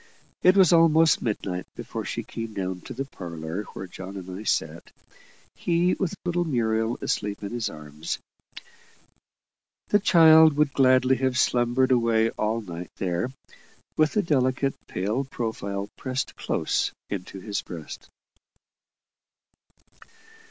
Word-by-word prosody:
It 185 Hz, +2 st, +5 dB
was 185 Hz, -3 st, +6 dB
almost 165 Hz, -1 st, +5 dB
midnight 95 Hz, -5 st, -3 dB
before -, -, -6 dB
she -, -, -3 dB
came 115 Hz, -1 st, -7 dB
down 95 Hz, -2 st, -3 dB
to 130 Hz, -, -7 dB
the 135 Hz, +2 st, -3 dB
parlour 85 Hz, -, -6 dB
where 95 Hz, -, -5 dB
John 95 Hz, +2 st, -8 dB
and 95 Hz, -1 st, -8 dB
I 100 Hz, -, -7 dB
sat, 110 Hz, -, -2 dB, 0.6 s
he 175 Hz, +1 st, +1 dB
with 190 Hz, -1 st, -2 dB
little 175 Hz, 0 st, +1 dB
Muriel 115 Hz, -6 st, 0 dB
asleep 105 Hz, 0 st, -2 dB
in 100 Hz, -, -4 dB
his 120 Hz, -3 st, -2 dB
arms. 75 Hz, -1 st, -6 dB, 1.7 s
The 205 Hz, -, +4 dB
child 160 Hz, -5 st, +7 dB
would 150 Hz, -2 st, +2 dB
gladly 130 Hz, -1 st, +4 dB
have 130 Hz, -1 st, 0 dB
slumbered 125 Hz, 0 st, +2 dB
away 115 Hz, -2 st, +3 dB
all 110 Hz, +2 st, -1 dB
night 90 Hz, -4 st, -7 dB
there, 90 Hz, +6 st, -1 dB, 0.6 s
with 155 Hz, 0 st, +2 dB
the 210 Hz, -, +2 dB
delicate, 135 Hz, -3 st, +1 dB
pale 105 Hz, +9 st, -1 dB
profile 100 Hz, -6 st, -4 dB
pressed 130 Hz, 0 st, -3 dB
close -, -, -1 dB, 0.2 s
into 95 Hz, -1 st, -5 dB
his 100 Hz, +2 st, -3 dB
breast. 80 Hz, -4 st, -9 dB
115 Hz, 130 wpm, -25 LUFS, 100-140 Hz, 1.7 s, child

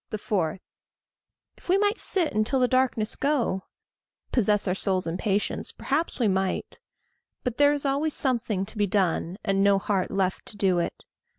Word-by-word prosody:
4. 190 Hz, -5 st, -1 dB, 1.0 s
If -, -, -18 dB
we 375 Hz, -, +5 dB
might 415 Hz, +2 st, +1 dB
sit 350 Hz, -5 st, +1 dB
until 215 Hz, +5 st, +1 dB
the 250 Hz, -, +4 dB
darkness 255 Hz, -4 st, +1 dB
go, 260 Hz, -10 st, 0 dB, 0.7 s
Possess 210 Hz, -4 st, +2 dB
our 180 Hz, -, +2 dB
souls 190 Hz, -1 st, -1 dB
in 165 Hz, 0 st, -2 dB
patience 200 Hz, +1 st, -1 dB
perhaps 300 Hz, +3 st, -2 dB
we 235 Hz, -, +3 dB
might; 190 Hz, -1 st, -1 dB, 0.6 s
But 250 Hz, -3 st, -3 dB
there 290 Hz, 0 st, +6 dB
is 290 Hz, -1 st, -2 dB
always 285 Hz, +3 st, +1 dB
something 230 Hz, -8 st, 0 dB
to 220 Hz, +3 st, -10 dB
be 205 Hz, -, +3 dB
done, 180 Hz, -2 st, 0 dB
And 195 Hz, 0 st, +1 dB
no 200 Hz, 0 st, +5 dB
heart 195 Hz, -1 st, -1 dB
left 190 Hz, -1 st, -1 dB
to 210 Hz, -, -6 dB
do 185 Hz, -3 st, +2 dB
it. 170 Hz, -, -4 dB
210 Hz, 170 wpm, -26 LUFS, 190-270 Hz, 1.0 s, there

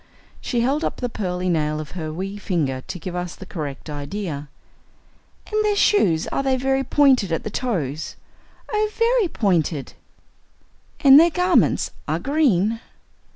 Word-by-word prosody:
She 240 Hz, -3 st, -1 dB
held 275 Hz, +6 st, 0 dB
up -, -, -1 dB
the 245 Hz, -, -3 dB
pearly 185 Hz, -5 st, -3 dB
nail 155 Hz, -3 st, 0 dB
of 155 Hz, -, -7 dB
her 160 Hz, -4 st, -5 dB
wee 190 Hz, +5 st, -5 dB
finger 150 Hz, -10 st, -1 dB
to -, -, -5 dB
give 180 Hz, +1 st, -6 dB
us 180 Hz, -1 st, -4 dB
the 190 Hz, -, -11 dB
correct 150 Hz, -6 st, -6 dB
idea. 150 Hz, 0 st, -5 dB, 1.0 s
"And 430 Hz, 0 st, +2 dB
their 420 Hz, -1 st, +2 dB
shoes 185 Hz, -, +3 dB
are -, -, -1 dB, 0.2 s
very 270 Hz, +1 st, +1 dB
pointed 260 Hz, -, +3 dB
at 165 Hz, -, -1 dB
the 215 Hz, -, -5 dB
toes?" 160 Hz, -, -3 dB, 0.6 s
"Oh, 425 Hz, 0 st, +1 dB
very 465 Hz, -2 st, +3 dB
pointed!" 170 Hz, -, -1 dB, 1.1 s
"And 275 Hz, -1 st, +9 dB
their 335 Hz, +2 st, +6 dB
garments 360 Hz, +2 st, +2 dB, 0.2 s
are -, -, 0 dB
green?" 230 Hz, -, +1 dB
195 Hz, 150 wpm, -22 LUFS, -, 1.1 s, And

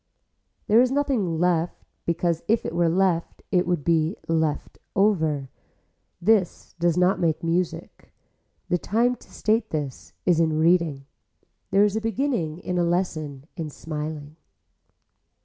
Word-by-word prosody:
There 220 Hz, +3 st, +5 dB
is 255 Hz, -, +3 dB
nothing 250 Hz, -, 0 dB
left 175 Hz, -1 st, 0 dB, 0.2 s
because 170 Hz, -1 st, 0 dB
if 225 Hz, +1 st, +2 dB
it -, -, -3 dB
were 170 Hz, -1 st, +2 dB
left 175 Hz, -1 st, 0 dB
it 180 Hz, -3 st, +2 dB
would 175 Hz, -5 st, 0 dB
be 165 Hz, +3 st, +2 dB
left 160 Hz, -2 st, -1 dB, 0.2 s
over. 160 Hz, -, +1 dB, 0.7 s
This 195 Hz, -1 st, +1 dB
does 170 Hz, 0 st, +2 dB
not 180 Hz, +2 st, +3 dB
make 165 Hz, -1 st, 0 dB
music. 170 Hz, +1 st, -2 dB, 0.6 s
The 180 Hz, -, +1 dB
time 240 Hz, +7 st, +1 dB
to -, -, -19 dB
state 220 Hz, +2 st, 0 dB
that 145 Hz, -4 st, -5 dB
is 175 Hz, -3 st, +3 dB
in 160 Hz, -2 st, +2 dB
reading. 160 Hz, -4 st, +2 dB, 0.6 s
There 195 Hz, +1 st, +4 dB
is 210 Hz, 0 st, 0 dB
a 220 Hz, -, 0 dB
beginning 225 Hz, -, -1 dB
in 180 Hz, 0 st, -3 dB
a -, -, +3 dB
lesson 155 Hz, -6 st, -2 dB
in 160 Hz, -4 st, -4 dB
smiling. 150 Hz, 0 st, -6 dB
170 Hz, 140 wpm, -25 LUFS, 160-195 Hz, 0.7 s, There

